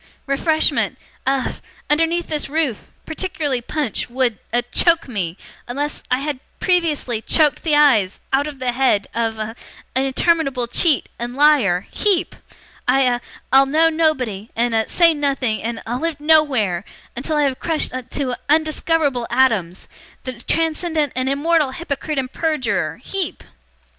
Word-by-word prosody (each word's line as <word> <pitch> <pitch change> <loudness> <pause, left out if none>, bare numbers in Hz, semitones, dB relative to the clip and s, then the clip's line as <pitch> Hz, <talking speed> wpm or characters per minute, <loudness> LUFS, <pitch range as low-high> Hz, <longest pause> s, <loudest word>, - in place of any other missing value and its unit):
Refreshment 310 +3 +1 0.3
a 270 -1 0 0.3
underneath 330 +3 +1
this 300 -3 -3
roof 295 -7 -1 0.2
particularly 310 -6 -2
punch 280 -2 -3
would 245 -3 0
a 240 +1 +1
choke 330 +7 +3
me 190 -8 -3 0.3
unless 285 +4 -3
I 255 +1 +1
had 290 -2 -3 0.2
previously 310 -10 0
choked 300 +4 +3
the 310 -3 +1
eyes 245 -11 +4
out 280 +2 +2
of 295 -2 -7
the 255 -1 -1
head 240 -5 +2
a - - -3
of 220 0 -4 0.4
interminable 270 0 +1
cheat, 285 +5 +2
and 240 +1 -5
liar 265 -12 +4
HEEP! 400 -5 0 0.5
I 270 - +4
a 245 -2 +2 0.3
I'll 270 +1 +6
know 320 +4 +4
nobody 260 -11 0
and 235 0 +1
a 220 -1 +1
say 335 -2 +4
nothing 275 -6 -1
and 230 0 -4
a 240 +2 -3
live 330 -1 -2
nowhere 275 - +2 0.3
until 300 +5 -2
I 295 - +3
have 270 -2 0
crushed 325 -2 +1
to 255 +1 -3
a - - -5
undiscoverable 310 -4 +1
atoms 225 -9 +1 0.4
the 255 - -5
transcendent 320 -1 0
and 255 +1 0
immortal 295 0 +1
hypocrite 305 -2 -4
and 260 -1 -2
perjurer 305 -8 -1
HEEP! 385 -4 -4
275 Hz, 145 wpm, -20 LUFS, 245-315 Hz, 0.5 s, I'll